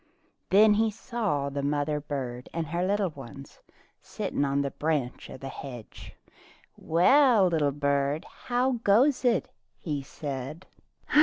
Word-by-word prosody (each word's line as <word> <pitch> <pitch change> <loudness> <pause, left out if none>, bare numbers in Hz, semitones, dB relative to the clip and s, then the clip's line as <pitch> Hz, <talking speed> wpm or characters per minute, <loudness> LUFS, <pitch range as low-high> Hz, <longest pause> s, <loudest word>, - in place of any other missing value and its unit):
Then 210 +2 +6
he 220 +2 +2
saw 210 - -2
the 140 0 -3
mother 145 +1 0
bird 130 -4 -5
and 165 -1 -1
her 170 +3 -2
young 200 -2 +1
ones 135 0 -11 0.4
sitting - - -3
on 140 0 +1
a 140 - -2
branch 150 -5 -2
of 130 - -10
the 135 - -5
hedge. 125 -4 -9 0.6
"Well, 225 - +4
little 155 -4 +1
bird, 140 +3 0 0.2
how 250 0 +1
goes 250 +8 +4
it.^" 245 -2 +2 0.3
he 150 -4 -3
said. 140 +4 -6
150 Hz, 135 wpm, -27 LUFS, 140-205 Hz, 0.6 s, Then